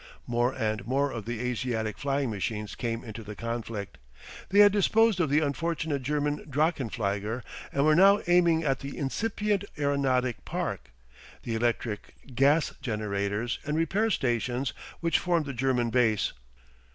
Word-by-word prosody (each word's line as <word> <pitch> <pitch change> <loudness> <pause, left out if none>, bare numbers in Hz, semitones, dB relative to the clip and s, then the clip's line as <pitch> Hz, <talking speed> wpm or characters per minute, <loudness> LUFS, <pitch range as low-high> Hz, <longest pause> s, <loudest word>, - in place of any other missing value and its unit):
More 120 +1 +1
and 110 -4 -2
more 140 +2 +1
of 110 -3 -6
the 120 -1 -4
Asiatic 120 -3 -2
flying 140 -3 -1
machines 105 +1 -3
came 115 -1 -3
into 110 -1 -7
the 105 0 -8
conflict. 115 -8 -5 0.5
They 200 +1 +6
had 205 0 +8
disposed 215 +1 +3
of 160 -5 +2
the 150 +2 +3
unfortunate 155 -1 -1
German 145 +2 -1
drachenflieger 120 - -1 0.3
and 140 +1 +1
were 155 - +5
now 195 +4 +7
aiming 170 -2 +4
at 135 -3 +1
the 140 0 -7
incipient 205 +7 -1
aeronautic 135 -4 +1
park, 65 - -4 0.5
the 115 - -3
electric 115 -2 -2 0.2
gas 140 +5 +3
generators 105 0 -2
and 150 +1 -1
repair 195 +8 +1
stations 125 - 0 0.3
which 165 -1 +2
formed 170 -3 +1
the 140 - -4
German 120 -1 +1
base. 115 -4 +2
130 Hz, 145 wpm, -28 LUFS, 115-155 Hz, 0.5 s, had